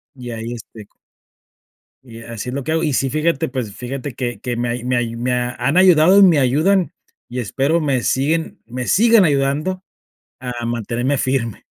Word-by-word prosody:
y 125 -2 -8
ahí, 115 +1 -5
este 110 -2 -11 1.2
y 115 -2 -12
así 115 +1 -6
es 130 - -5
lo 140 - -3
que 155 - -3
hago. 165 +1 0
Y, 150 -3 0
sí, 135 +1 +1
fíjate, 155 -1 0
pues, 125 -6 -4
fíjate 130 +1 -6
que 120 0 -4
que 120 -1 -4
me 120 0 -1
hay 120 0 -3
me 125 0 0
hay 115 -1 -2
me 125 +2 -2
han 125 +5 -1
ayudado, 185 0 +6
y - - +8
me 170 -6 +5
ayudan, 155 +7 +2 0.4
y 125 - -4
espero 140 - 0
me 135 -4 0
siguen 155 +5 0
me 125 +1 -5
sigan 225 -1 +5
ayudando 150 +6 0 0.6
a 120 -2 -5
mantenerme 120 +4 -1
firme. 130 -5 -2
130 Hz, 185 wpm, -19 LUFS, 120-155 Hz, 1.2 s, y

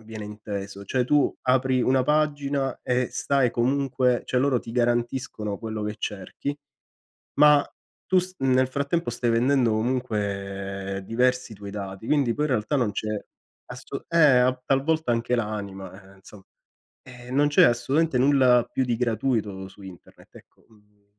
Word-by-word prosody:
viene 110 -1 -8
inteso, 100 -1 -7
cioè 125 +5 0
tu 145 +2 +2
apri 130 0 +2
una 130 0 +3
pagina, 145 -2 0
e 125 0 0
stai 135 -3 +1
comunque 125 0 +1
cioè 125 - 0
loro 135 -1 +2
ti 115 - -10
garantiscono 120 -3 -1
quello 110 -1 -5
che 105 - -3
cerchi, 105 +8 -5 0.8
ma 150 -1 +6 0.4
tu 185 0 +3
s 185 +1 -3
nel 130 -1 +3
frattempo 140 +2 -2
stai 120 0 -1
vendendo 120 +1 +2
comunque 100 -5 -3
diversi 125 0 0
tuoi 100 0 -9
dati, 100 +1 -7
quindi 140 -6 +2
poi 150 - -1
in - - -4
realtà 125 +3 0
non 120 -6 +1
c'è 110 - -4 0.6
asso - - -8
eh, 170 - +1 0.2
a 125 +1 +2
tal 135 0 +2
volta 160 -4 0
anche 120 +1 0
l'anima, 100 -3 -6
eh, - - -20
insomma. 95 +1 -15 0.6
E 125 -1 -13
non 145 +3 +3
c'è 145 - +4
assolutamente 135 +4 +2
nulla 130 -3 +4
più 130 - 0
di 120 -2 -1
gratuito 110 -5 -1
su 100 +1 -16
internet, 95 -2 -14
ecco, - - -19
mhmm 105 -2 -27
120 Hz, 155 wpm, -25 LUFS, 105-135 Hz, 0.8 s, ma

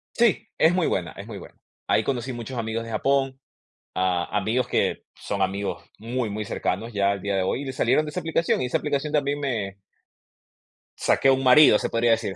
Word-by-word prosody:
Sí, 235 -6 +2
es 160 +2 +4
muy 180 -2 +1
buena 85 -4 -1
es 100 - -9
muy 110 -3 -7
buena. 95 - -12 0.3
Ahí 110 - +3
conocí 130 -1 -2
muchos 120 +1 -6
amigos 115 0 -2
de 115 - -8
Japón, 135 +3 0 0.5
ah, 90 -1 0
amigos 110 +5 0
que - - 0
son 100 -1 -4
amigos 100 +1 -2 0.2
muy, 120 +1 -2
muy 105 +1 -4
cercanos, 110 +4 -3
ya 100 -1 +2
al 100 -2 -3
día 100 -1 -1
de 95 - +1
hoy, 95 - -1
y 130 - -2
salieron 155 +3 +2
de - - -5
esa 180 - -3
aplicación, 165 -2 0
y - - 0
esa 125 - 0
aplicación 150 +1 -2
también 145 -1 +1
me 110 -9 -3 1.2
saqué 135 - +3
un 135 0 +1
marido, 130 -3 +7
se - - -2
podría 115 0 +2
decir. 110 -4 0
115 Hz, 205 wpm, -24 LUFS, 100-135 Hz, 1.2 s, marido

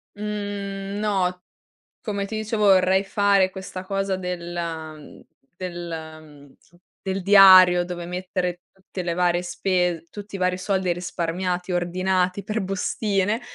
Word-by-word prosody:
Mhmm, 205 -1 -4
no, 185 -4 0 0.6
come 200 -3 -3
ti 215 +2 -5
dicevo 215 -1 0
vorrei 190 0 +5
fare 200 -1 +2
questa 190 0 -7
cosa 195 0 -1
della 170 -3 -5
mhmm, 150 -1 -14 0.3
del 175 -2 -6 0.3
mhmm, 145 -3 -17 0.5
del 190 -1 -3
diario 185 -2 +8
dove 175 -1 -6
mettere 180 0 -3
tutte 190 -1 -8
le 170 -1 -2
varie 175 0 +1
spes 180 -2 -1
tutti 205 -1 -8
i - - -8
vari 180 0 +1
soldi 190 0 -1
e - - +4
risparmiati, 180 +1 -3
ordinati 185 +2 0
per 215 +2 -2
bustine, 195 +2 -1
185 Hz, 135 wpm, -23 LUFS, 175-195 Hz, 0.6 s, diario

